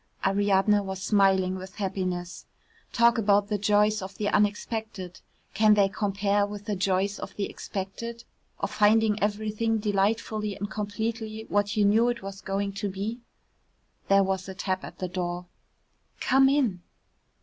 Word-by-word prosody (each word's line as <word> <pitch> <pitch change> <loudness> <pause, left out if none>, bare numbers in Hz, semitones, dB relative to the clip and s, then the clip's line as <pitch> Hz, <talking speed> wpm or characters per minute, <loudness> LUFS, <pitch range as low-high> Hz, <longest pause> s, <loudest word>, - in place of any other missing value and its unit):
Ariadne 200 +1 +3
was 190 -1 -5
smiling 190 -2 +2
with 190 0 -9
happiness. 185 -3 -3 0.4
Talk 235 0 +4
about 205 -1 +3
the 210 -1 0
joys 210 +1 +3
of 190 +1 -7
the 205 -1 0
unexpected, 205 -2 -1 0.3
can 215 0 +5
they 200 -1 +4
compare 200 0 0
with 205 0 -5
the 210 - -1
joys 195 +2 0
of - - -7
the 205 - -2
expected, 230 +5 -6 0.4
of - - -2
finding 215 0 +3
everything 215 +2 0
delightfully 210 0 0
and 205 +1 -5
completely 220 +1 -4
what 205 +1 0
you 210 - +4
knew 225 +4 +4
it 240 -4 -3
was 195 0 -7
going 200 +1 -2
to 205 - -1
be? 205 +5 -4 0.9
There 195 0 +5
was 190 0 -2
a 190 - -7
tap 190 -1 -2
at - - -9
the 185 - -3
door. 175 0 -3 0.7
"Come 270 +1 +4
in." 250 -11 +1
205 Hz, 150 wpm, -27 LUFS, 195-215 Hz, 0.9 s, can